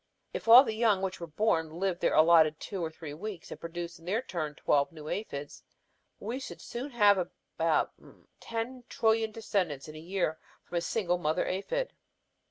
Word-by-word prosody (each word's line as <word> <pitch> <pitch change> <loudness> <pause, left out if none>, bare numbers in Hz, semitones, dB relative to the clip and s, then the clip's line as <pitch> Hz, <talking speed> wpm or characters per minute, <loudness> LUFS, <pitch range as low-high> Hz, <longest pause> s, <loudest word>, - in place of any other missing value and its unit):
If - - -5
all 240 +3 +11
the 225 -5 -2
young 215 -4 +2
which 190 -2 -3
are 170 - -5
born 165 -1 +1
live 180 0 -1
their - - +2
allotted 155 -1 +6
two 195 -4 -4
or 160 - -1
three 160 -2 -8
weeks 185 +2 -7
and - - -7
produce 170 0 -6
in 165 - -17
their 215 +7 0
turn 155 - -4
twelve 140 0 +2
new 155 -2 -10
aphids, 145 -7 -5 0.6
we 235 +5 -4
should 270 - -8 0.3
have 205 -4 +5
about 165 -3 -1 0.5
ten 235 +2 -4
trillion 220 -1 +2
descendants 190 -10 -2
in 155 - -9
a - - -7
year 170 -1 -1 0.2
from 175 - -4
a - - -5
single 180 -1 0
mother 155 -2 0
aphid. - - -2
180 Hz, 180 wpm, -30 LUFS, 160-220 Hz, 0.6 s, all